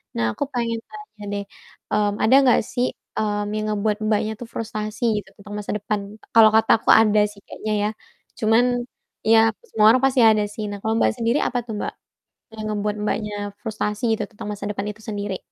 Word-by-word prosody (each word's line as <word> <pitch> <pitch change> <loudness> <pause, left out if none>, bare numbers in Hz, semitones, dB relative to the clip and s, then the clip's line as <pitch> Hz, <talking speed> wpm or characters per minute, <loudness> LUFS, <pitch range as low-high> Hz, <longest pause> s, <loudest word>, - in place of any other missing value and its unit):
Nah, 115 - 0
aku - - -1
pengen 230 -2 -1
tanya 420 - -11 0.2
deh, - - -4 0.5
mmm, 210 0 +2
ada 255 +5 +5
nggak 250 -3 +5
sih, 245 0 +1 0.3
mmm, 205 -1 -1
yang 215 - -2
ngebuat 210 0 0
Mbaknya 215 +1 +1
tuh 240 - -7
frustasi 215 0 -4 0.2
gitu, - - -20
tentang 205 +1 -10
masa 205 - -5
depan, 205 0 -2 0.4
kalau 220 -1 +9
kata 220 0 +4
aku - - -2
ada 215 -1 +6
sih 205 - -16
kayaknya 215 0 -4
ya, 210 - +1 0.5
cuman 225 +3 +5 0.7
ya, 225 - +8 0.3
semua 215 - +2
orang 235 - +6
pasti 265 -1 +3
ada 220 -2 +5
sih. 215 - -5
Nah, 205 - -5
kalau 220 0 0
Mbaknya - - +2
sendiri, 235 +5 +2
apa 250 - -1
tuh 225 - -6
Mbak - - -3 0.7
yang 215 - -4
ngebuat 210 0 -1
Mbaknya 210 -1 -2 0.3
frustasi 215 0 -3
gitu, - - -3
tentang 210 -1 -8
masa 205 -1 -6
depan 200 0 -3
itu 210 - -10
sendiri? 205 -2 -3
215 Hz, 195 wpm, -22 LUFS, 210-225 Hz, 0.7 s, kalau